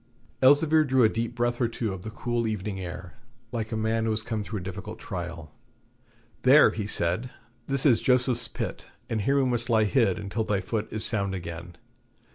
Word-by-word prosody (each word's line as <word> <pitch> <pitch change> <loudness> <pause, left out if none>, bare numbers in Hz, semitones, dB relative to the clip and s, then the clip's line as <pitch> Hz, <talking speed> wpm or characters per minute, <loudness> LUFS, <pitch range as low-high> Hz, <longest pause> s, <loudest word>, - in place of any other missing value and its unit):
Elzevir 150 +4 +5
drew 130 -3 +3
a 110 - +6
deep 115 +2 -3
breath 120 +1 -1
or 120 - +3
two 115 -3 -3
of 95 - -7
the 110 - -6
cool 120 +1 -2
evening 105 -2 -3
air, 90 -1 -8 0.3
like 115 -2 -3
a 110 - -2
man 110 +1 0
who - - 0
has 110 0 -1
come 110 -2 -3
through 105 +1 -5
a - - -8
difficult 95 0 -7
trial. 85 -3 -6 0.9
'There,' - - +7
he 105 -2 -4
said, 95 +5 +1 0.4
'this 135 0 +1
is 120 -6 +5
Joseph's 125 -2 +2
Pit, - - -5 0.2
and 110 -2 0
here 135 +7 +1
we 135 - +3
must 120 -1 -1
lie 110 -2 +4
hid 105 -4 +2
until 105 +3 -3
thy 105 -2 0
foot 105 +3 -3
is 110 - 0
sound 100 -4 0
again. 85 0 -7
110 Hz, 200 wpm, -27 LUFS, 95-120 Hz, 0.9 s, There